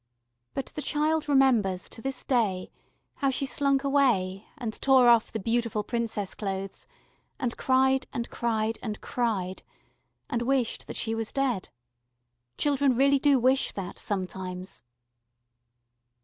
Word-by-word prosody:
But 275 - -2
the 300 - -4
child 305 +1 0
remembers 235 -10 +3
to - - -9
this 270 0 -3
day 210 -8 0 0.5
how 275 - +1
she 270 +1 0
slunk 275 0 +1
away 225 -9 +1
and 235 -6 -4
tore 260 -2 +6
off 235 -2 +5
the - - -2
beautiful 230 0 0
Princess 225 -4 -2
clothes, 195 -1 -5 0.5
and 245 -3 -1
cried 265 0 +2
and 235 - -3
cried 225 -1 -1
and 215 -3 -4
cried, 200 -7 -2 0.7
and 235 -4 -2
wished 250 -1 0
that - - -6
she 225 - -1
was 225 -1 -2
dead. 260 -8 -1 0.9
Children 280 -3 +2
really 275 +2 +4
do 285 -1 +4
wish 260 +2 +2
that, 190 -3 -6
sometimes. 185 -1 -4
235 Hz, 135 wpm, -27 LUFS, 210-270 Hz, 0.9 s, tore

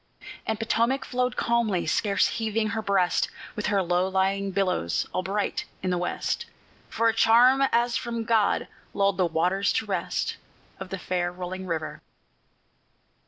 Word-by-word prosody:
And 220 - 0
Potomac 235 +4 +1
flowed 250 0 -1
calmly, 230 -6 +1
scarce 200 +5 +2
heaving 220 -1 -1
her 220 +1 -2
breast, 195 -4 +1 0.3
With 210 - -2
her 200 -2 +2
low 180 +1 +1
lying 195 +1 0
billows 185 - 0
all 185 - 0
bright 200 +3 -2 0.2
in 185 - 0
the 180 - +1
west, 175 - -2 0.4
For 230 - +1
a 225 - +3
charm 240 +4 +5
as 235 0 +2
from 235 -1 -3
God 225 -2 +2 0.3
lulled 200 -2 +2
the 185 - +3
waters 180 +5 +1
to - - 0
rest - - -2 0.4
Of - - -7
the 190 - -4
fair 175 0 -1
rolling 185 +1 -6
river. 160 -2 -4
200 Hz, 155 wpm, -26 LUFS, 185-225 Hz, 0.4 s, charm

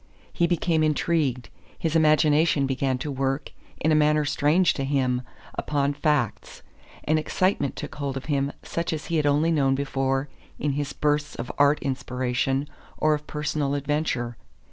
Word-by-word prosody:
He 170 - +2
became 170 -1 +1
intrigued; 150 -5 0 0.3
his 165 -1 -1
imagination 155 -1 +4
began 135 -1 0
to 145 +3 -4
work, 135 +1 -2 0.3
in 155 - +2
a - - +5
manner 150 0 +3
strange 155 +5 +3
to 135 - -3
him, 130 -3 +1 0.3
upon 145 -1 0
facts; 145 -5 -1 0.4
an 155 +1 +2
excitement 170 -3 0
took - - -6
hold 140 -2 -3
of 135 - -6
him 140 -2 0
such 170 0 -2
as 155 -1 -4
he - - +3
had 150 -1 +2
only 150 +3 +3
known 135 -4 +2
before 135 0 -1 0.3
in 150 - -1
his 145 0 -2
bursts 150 0 0
of 120 - -5
art 145 +1 +5
inspiration 130 0 -1 0.3
or 155 0 +3
of 150 0 -4
personal 150 -1 -1
adventure. 140 -5 -1
145 Hz, 160 wpm, -25 LUFS, 135-155 Hz, 0.4 s, a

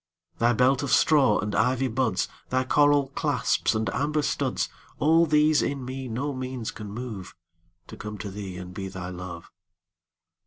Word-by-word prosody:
Thy 120 +1 +4
belt 125 +2 +3
of 140 - -3
straw 135 -9 +4
and 105 0 -2
ivy 130 +1 +2
buds, 110 -5 0 0.2
Thy 130 0 +1
coral 145 +1 +3
clasps 135 - 0
and 110 0 0
amber 150 +1 0
studs,—All 165 +3 0
these 150 0 +4
in 140 -2 -2
me 130 +1 -5
no 130 +5 -2
means 130 -3 -4
can 105 0 -8
moveTo 90 -6 -10
come 105 0 -6
to 100 -1 -6
thee 95 -2 -6
and 90 0 -8
be 95 +1 -5
thy 95 -1 -6
Love. 90 -2 -8
125 Hz, 155 wpm, -26 LUFS, 95-135 Hz, 0.2 s, Thy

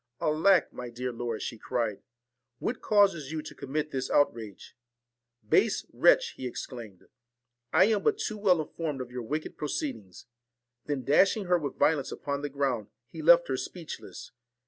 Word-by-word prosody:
' - - -53
Alack! 165 +5 +3
my 125 -1 -6
dear 125 +2 -4
lord,' 115 -2 -4
she 115 - -5
cried, 115 -5 -2 0.3
' 125 0 -57 0.2
what 235 - -3
causes 195 -9 +3
you 155 -1 -3
to - - -9
commit 150 +3 -3
this 130 -1 -3
outrage? 115 -8 0 0.2
' 120 0 -60
' 120 -2 -41
Base - - +3
wretch! - - +5
' - - -26
he 130 - -4
exclaimed, 115 -6 -8 0.4
' - - -59 0.3
I 180 +4 +6
am 215 -1 +2
but 430 -2 +2
too 215 - -3
well 185 -5 +4
informed 155 -2 -4
of 125 -1 -7
your 125 0 -4
wicked 150 +7 -4
proceedings; 125 -10 -4 0.3
' 120 0 -57
then 145 -3 -2
dash 170 - +4
ing 205 - -4
her 180 -1 +3
with 145 -4 -5
violence 150 -4 +2
upon 140 0 -3
the 145 - -3
ground, 135 -6 -1 0.2
he 160 - -7
left 170 +2 +6
her 130 - -1
speechless. 165 +4 -8
140 Hz, 190 wpm, -29 LUFS, 120-160 Hz, 0.4 s, I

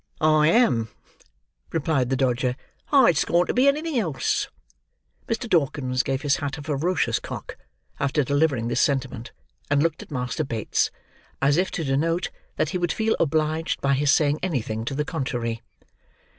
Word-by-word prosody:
"I 155 -1 +4
am," 160 - +3 0.8
replied 145 -5 0
the 135 - +1
Dodger. 125 -1 +1 0.4
"I'd 255 - +5
scorn 175 +4 +2
to - - -2
be 255 +3 +4
anything 300 -1 +1
else." 160 -11 -1 0.8
Mr. 230 +2 -2
Dawkins 140 - +1
gave 135 +1 -2
his 145 -2 +2
hat 145 0 -4
a 145 - -8
ferocious 155 +4 0
cock, - - -7 0.4
after 140 +1 +1
delivering 140 -3 +1
this 120 - +1
sentiment, 130 -4 -1 0.4
and 145 0 +3
looked 165 -1 -1
at - - -12
Master 125 +1 -2
Bates, 115 -6 0 0.5
as 140 +2 +3
if 185 +1 +2
to 165 - -3
denote 160 +6 0 0.2
that - - 0
he 180 - -2
would 175 -2 0
feel 220 +4 +1
obliged 155 +1 0
by 140 0 +1
his 140 +1 +3
saying 150 -1 +2
anything 115 -10 -2
to 135 - -3
the 150 +1 -1
contrary. 120 -7 -3
145 Hz, 160 wpm, -24 LUFS, 130-165 Hz, 0.8 s, I'd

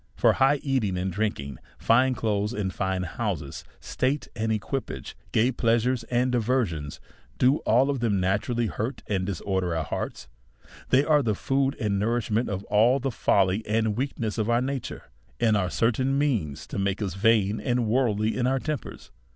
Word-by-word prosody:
For - - +4
high 135 +2 +3
eating 125 - 0
and 95 +1 -2
drinking, 90 -9 -3 0.2
fine 130 +3 +3
clothes, 105 -1 -1
and 95 -4 -2
line 95 -1 0
houses, 85 -6 -4 0.2
state 135 +3 -1
and 110 -1 -1
equipages, 110 +5 -4 0.2
gay 115 +4 +3
pleasures 120 +1 +1
and 125 +1 +1
diversions, 110 - -1 0.4
do 130 +4 +4
all 125 +5 +4
of 140 - -2
them 110 -5 +1
naturally 105 +6 0
hurt 115 +4 -4
and 95 -3 -1
disorder 95 -2 -1
our 80 - -1
hearts; 70 - -5 0.6
they 135 +3 +4
are 150 -1 +4
the 110 -5 0
food 135 +5 0
and 105 -3 0
nou 115 +4 +1
I'ishment 110 0 -1
of 100 -1 -3
all 115 +7 +3
the 135 0 -2
folly 100 -1 +2
and 110 0 +1
weakness 120 -3 -3
of 110 +1 0
our 120 0 +3
nature,, 135 0 -4 0.4
and 115 -2 +3
are 95 -3 +1
certain 130 +6 +1
means 110 - -1
to - - -5
make 100 0 0
us 100 -5 -2
vain 105 0 +2
and 120 -1 0
worldly 110 -2 +1
in 125 -1 +1
our 135 +1 +2
tempers. 150 0 -5
110 Hz, 175 wpm, -26 LUFS, 100-130 Hz, 0.6 s, For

